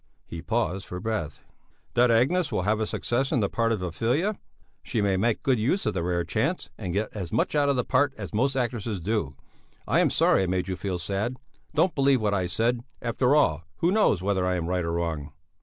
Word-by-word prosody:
He 85 - -7
paused 100 -1 -1
for 90 - -5
breath. 105 -9 -3 0.5
"That 125 0 +4
Agnes 135 +9 +2
will 90 - 0
have 105 +2 +1
a 110 - -1
success 130 +3 -1
in - - +2
the 100 - +2
part 115 -1 0
of 105 -5 -1
Ophelia? 125 - 0 0.5
She 120 - -2
may 100 -2 +2
make 110 +4 0
good 130 -4 +2
use 135 - 0
of - - 0
the 90 - -1
rare 85 0 0
chance - - -1
and 90 - -5
get 105 +5 -2
as 95 -5 -5
much 115 - +1
out 145 -1 +3
of 140 - +2
the 125 - +1
part 135 +2 +2
as - - -7
most 135 +6 +1
actresses 120 -5 -2
do. 85 -6 -2 0.5
I - - +3
am - - +4
sorry - - +3
I 95 - 0
made 90 0 -1
you 95 - -2
feel 95 0 -3
sad; 100 +8 -2 0.4
don't 180 -2 +3
believe 135 -2 +3
what 105 -2 0
I 95 -3 0
said; 115 +5 0 0.2
after 125 +4 +1
all, 80 - +3 0.2
who 170 - +2
knows 190 - +3
whether 95 -2 +1
I 90 0 +1
am 85 -2 -2
right 90 +1 0
or 85 0 -2
wrong?" 80 -4 -3
110 Hz, 225 wpm, -26 LUFS, 90-125 Hz, 0.5 s, That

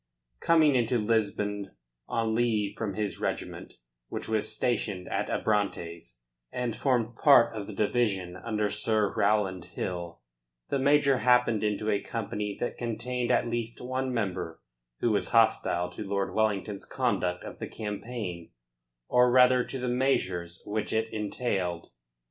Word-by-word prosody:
Coming 160 -3 +4
into 120 -1 +2
Lisbon 105 -2 -1 0.3
on 115 -1 0
leave 110 -3 +1
from 105 -4 -3
his 105 -3 -2
regiment, - - -4 0.3
which - - -5
was 110 -1 -1
stationed 105 -5 -1
at - - -1
Abrantes, 85 - -2 0.3
and 125 -3 -2
formed 120 -4 0
part 120 -4 +6
of 105 -2 -5
the 105 - -7
division 100 -4 0
under 105 +1 -1
Sir 105 -1 +1
Rowland 100 -3 +1
Hill, 85 -2 -5 0.5
the 140 - 0
major 140 -1 +4
happened 125 -4 +3
into 105 0 0
a 100 - +1
company 105 -3 -4
that 120 - -3
contained 120 +1 -2
at 125 -1 +3
least 115 0 -3
one 130 +1 -2
member 95 -8 -2 0.4
who 120 - +2
was 105 - 0
hostile 90 -6 +3
to 90 - -6
Lord 100 -1 -2
Wellington's 105 -2 0
conduct 90 0 -1
of - - -9
the - - -4
campaign, 105 -5 -5 0.6
or 125 0 +5
rather 125 0 +6
to 135 - -6
the 125 0 -3
measures 95 -9 0
which 105 0 -2
it 110 0 0
entailed. 100 -5 -2
110 Hz, 145 wpm, -28 LUFS, 100-120 Hz, 0.6 s, part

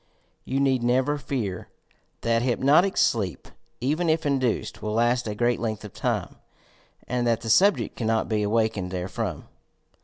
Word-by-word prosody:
You 135 - -1
need 135 -2 +2
never 130 +5 +1
fear 115 -9 -4 0.5
that 115 0 +1
hypno 135 +5 +4
tic 195 +1 -2
sleep, 100 -6 0 0.3
even 155 +7 0
if 160 0 +1
induced, 130 -5 -1
will 105 0 -3
last 120 +1 +1
a 105 - -3
great 120 +2 +1
length 110 -2 -3
of 105 - -10
time - - -2 0.7
and 120 -1 -1
that 115 -1 +1
the 115 - -1
subject 200 - +3
cannot 110 -1 0
be 110 -1 0
awakened 105 -3 0
therefrom. 90 0 -4
120 Hz, 155 wpm, -25 LUFS, 110-135 Hz, 0.7 s, hypno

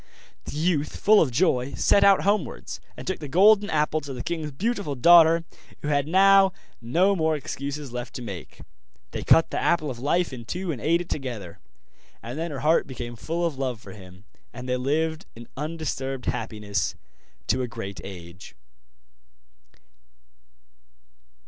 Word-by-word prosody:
The - - -7
youth, 155 -2 0
full 210 0 +5
of 155 - +2
joy, 130 -1 +1
set 200 - +4
out 200 -1 +5
homewards, 200 - -1 0.2
and - - -8
took 190 - -2
the 150 - -6
Golden 200 +7 +5
Apple 155 0 +1
to 140 -1 -7
the 125 - -6
king's 160 -3 -3
beautiful 195 - -2
daughter, 165 +4 +6 0.4
who 150 - -2
had 145 -1 +1
now 195 +2 +5 0.3
no 175 +12 +2
more 160 -3 +1
excuses 140 -1 -5
left 120 0 -6
to 125 - -5
make. 95 -8 -8 0.5
They - - -4
cut 165 - +4
the - - -1
Apple 155 -4 +1
of 120 - -8
Life 155 +4 0
in 120 -2 -8
two 180 +7 -3
and 130 - -6
ate 170 +2 +2
it 175 - -9
together; 120 - -5 0.6
and 120 +2 -6
then 165 +1 -2
her 140 -4 -6
heart 160 +2 +3
became 120 -2 -7
full 165 +9 -2
of 150 -5 -3
love 130 -4 -2
for - - -12
him, 95 -1 -14 0.3
and 125 +1 -8
they 125 - 0
lived 160 +6 -1
in 115 0 -11
undisturbed 135 -4 -4
happiness 105 -2 -2 0.5
to 130 - +1
a 125 - -2
great 105 -4 -7
age. 90 -1 -10
145 Hz, 165 wpm, -25 LUFS, 125-170 Hz, 0.6 s, daughter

